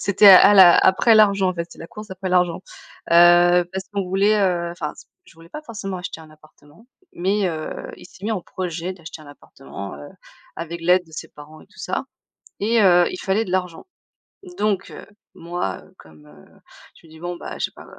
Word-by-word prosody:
C'était 200 +1 +3
à 195 +2 +8
la 185 -3 +8
après 220 +5 +4
l'argent 200 -3 +4
en 185 - -2
fait, 170 -1 -4
c'est - - -15
la 165 - -9
course 210 +4 -12
après 190 0 -6
l'argent. 180 -2 +1 0.5
Heu. 175 +1 +5
Parce 190 0 -5
qu'on 200 -1 -2
voulait, 195 +3 +1
heu, 175 -3 0
enfin, 155 -3 -6 0.3
je - - -21
voulais 165 0 -17
pas 300 - -9
forcément 205 -8 -7
acheter 180 -2 -8
un 155 -1 -15
appartement, 155 +5 -22 0.3
mais 195 +3 -1
heu, 160 -2 -6
il - - -14
s'est 190 +2 -16
mis 225 - -1
en 205 - -3
projet 175 0 -6
d'acheter 165 -3 -12
un - - -16
appartement, 130 -8 -11
heu, 145 - -11 0.5
avec 170 +1 -7
l'aide 180 +1 +2
de 160 - -21
ses 155 - -8
parents 150 +1 -15
et - - -19
tout - - -24
ça, - - -4 0.5
et 225 +3 +1
heu, 175 -2 +5
il - - -7
fallait 200 +4 -1
de 185 - -9
l'argent, 180 - -3 0.7
donc 205 -3 -1
heu, - - -11 0.3
moi, 170 - -5
heu, - - -22
comme, 75 -2 -18
heu, 75 0 -20 0.4
je - - -23
me - - -20
dis 160 - -15
bon 175 +1 -5
bah - - -8
j'ai - - -2
pas - - -15
180 Hz, 210 wpm, -21 LUFS, 165-195 Hz, 0.7 s, à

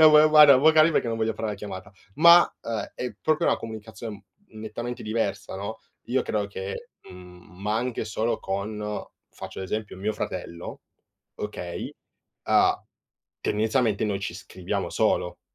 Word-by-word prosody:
no, 155 -1 +9
ma 150 - +8
ma, - - +7
guarda, 150 -3 +9
vocali 155 +3 +6
perché 130 - +1
non 115 - -1
voglio 110 0 +1
far 110 - -3
la 105 - -2
chiamata, 100 -1 -8 0.2
ma 170 +2 +8 0.4
è 125 -4 -4
proprio 155 +2 +2
una - - +3
comunicazione 110 -1 -8 0.2
nettamente 110 +2 -6
diversa, 105 -4 -2
no? 100 +3 -5 0.3
Io 130 +2 +1
credo 105 -2 -1
che, 95 -1 -6 0.2
mhmm, 90 0 -14
ma 105 +1 0
anche 120 -1 -2
solo 110 +1 -1
con, 105 +2 -3 0.3
faccio - - -8
l'esempio, 105 +2 -4
mio 100 +3 -1
fratello, 85 -4 -6 0.5
okay, - - -5 0.5
ha - - +3 0.6
tendenzialmente, 110 0 +1
noi 100 -2 -1
ci 100 - -4
scriviamo 95 0 -4
solo, 90 -1 0
110 Hz, 145 wpm, -26 LUFS, 100-120 Hz, 0.6 s, no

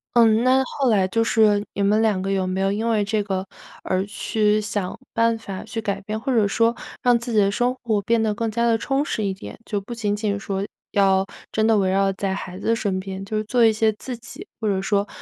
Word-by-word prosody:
嗯， 225 -1 +5
那 260 +1 +4
后 265 0 -1
来 195 -4 +3
就 225 +4 +1
是 210 -2 +3
你 200 - -3
们 205 +2 +3
2 210 -4 +2
个 195 - -2
有 190 -1 +1
没 185 +1 -2
有 195 0 +2
因 220 +3 -1
为 220 -3 +2
这 210 +1 0
个 190 -2 -2 0.4
而 185 +1 -1
去 210 0 0
想 205 -3 -3
办 230 0 +2
法 195 -4 -7
去 225 - -5
改 200 -2 -2
变？ 215 +2 -4
或 265 - -2
者 220 -5 +3
说， 230 +3 +2 0.3
让 245 -1 +4
自 235 +1 -5
己 215 - +4
的 200 -1 +4
生 245 +4 +1
活 220 -4 +1
变 230 +2 +2
得 220 - +1
更 225 0 -2
加 235 +2 +1
地 230 -1 +3
充 270 +4 0
实 220 -7 -2
一 195 - 0
点？ 195 - -10
就 205 -2 -2
不 195 - -12
仅 210 -3 -1
仅 205 -1 -1
说， 195 0 -3 0.3
要 195 -1 +3 0.3
真 220 - +1
的 225 0 +4
围 190 -1 +1
绕 195 +1 +2
在 195 0 -2
孩 185 -1 -7
子 230 - +1
身 200 -5 -1
边， 190 0 -6
就 215 +2 -4
是 215 - 0
做 235 +1 +3
一 220 - +5
些 220 0 +2
自 250 +4 -5
己 305 - -8
或 220 - -2
者 195 -2 +1
说， 200 +1 0
210 Hz, 265 characters per minute, -23 LUFS, 195-230 Hz, 0.4 s, 嗯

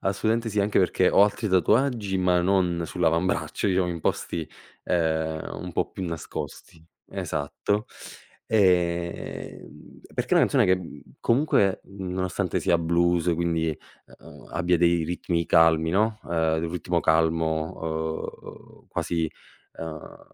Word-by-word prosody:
assolutamente 110 +4 0
sì, 105 -1 0
anche 100 +1 +1
perché 90 0 +3
ho - - +6
altri 105 +2 +1
tatuaggi 105 - +2
ma 90 -1 +3
non 90 -2 +1
sull'avambraccio 85 +3 0
io 95 -2 +2
in 85 -2 -4
posti, 80 0 -2 0.4
ehm, 80 -2 -1
un 90 - -7
po' - - -1
più 95 - -7
nascosti, 80 0 -7 0.3
esatto. 100 +8 -2 0.6
Ehm, 90 -5 -1
perché - - -1
è - - +6
una - - +6
canzone - - +3
che, 95 - +4
mhmm, 90 -2 -8 0.2
comunque 115 -7 +2 0.2
nonostante 95 -1 -2
sia 85 - +2
blues, 85 +1 +2
quindi, 80 -2 -1 0.4
uhm, - - -14
abbia 85 +1 +1
dei 85 -1 +3
ritmi 85 0 -1
calmi, 80 -1 +4
no, 110 +3 +1
ehm, 80 -1 0
un 80 - -3
ritmo 90 -3 -1
calmo, 80 0 0 0.6
uhm, - - -25
quasi, 80 -2 -2 0.5
ehm, 80 -2 -8
85 Hz, 130 wpm, -25 LUFS, 80-95 Hz, 0.6 s, ho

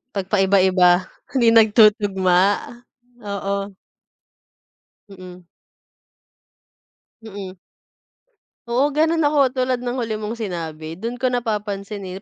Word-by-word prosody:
Pagpaiba-iba. 190 -2 +2 0.2
Hindi 250 -3 +2
nagtutugma, 205 -4 +4 0.9
oo. 200 0 -4 1.4
Mm. 185 -2 -12 1.8
Mm. 195 -3 -9 1.1
Oo, 275 +4 +1
gano'n 320 +1 +1
ako 280 -3 +2
tulad 255 -1 0
ng 245 +1 -4
huli 230 -3 -3
mong 215 +2 -5
sinabi. 160 -6 -6
Do'n 230 +8 -6
ko 255 0 -1
napapansinin, 205 -4 -4
205 Hz, 85 wpm, -20 LUFS, 190-245 Hz, 1.8 s, nagtutugma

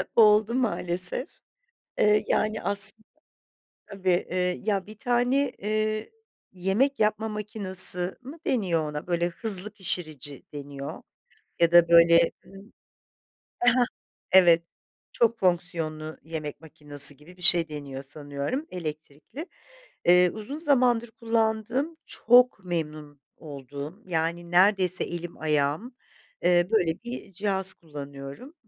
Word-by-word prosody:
oldu 215 +1 +4
maalesef. 185 -2 -1 0.7
Eee, 210 0 +3
yani 215 0 0
aslında 205 +2 +4 0.8
Tabii, 190 -3 -1
iii, 180 +3 -2
ya 195 -3 0
bir 215 0 -12
tane, 250 +3 0
eee, 215 - -2 0.4
yemek 195 +10 0
yapma 215 +1 0
makinesi 195 -4 +3
mı 275 +6 -11
deniyor 175 - 0
ona? 150 0 -7
Böyle 175 -1 0
hızlı 200 +2 +1
pişirici 155 -7 -5
deniyor 140 -1 -8 0.6
ya 170 -1 +3
da 170 -1 +6
böyle, 170 0 +6
ımm, 195 +3 -16 0.9
he 245 - +4
he, 250 +1 +2 0.5
evet 175 -3 +6 0.5
çok 235 -1 +1
fonksiyonlu 170 -4 -2
yemek 155 -2 -7
makinesi 145 -2 0
gibi 155 +6 -18
bir - - -17
şey 170 -2 +6
deniyor 140 -3 -8
sanıyorum 145 - -5
elektrikli. 155 - -8 0.6
Eee, 180 +1 +5
uzun 220 +6 -8
zamandır 250 -7 +1
kullandığım 230 +7 -2
,çok 245 -4 +3
memnun 155 -4 -5 0.2
olduğum, 145 - -9
yani, 170 0 -3
neredeyse 185 0 +3
elim 175 0 -7
ayağım, 155 - -1 0.5
eee, 175 0 +3
böyle 175 -7 +2
bir 240 -4 -8
cihaz 190 0 +1
kullanıyorum 140 - -10
180 Hz, 115 wpm, -25 LUFS, 160-220 Hz, 0.9 s, da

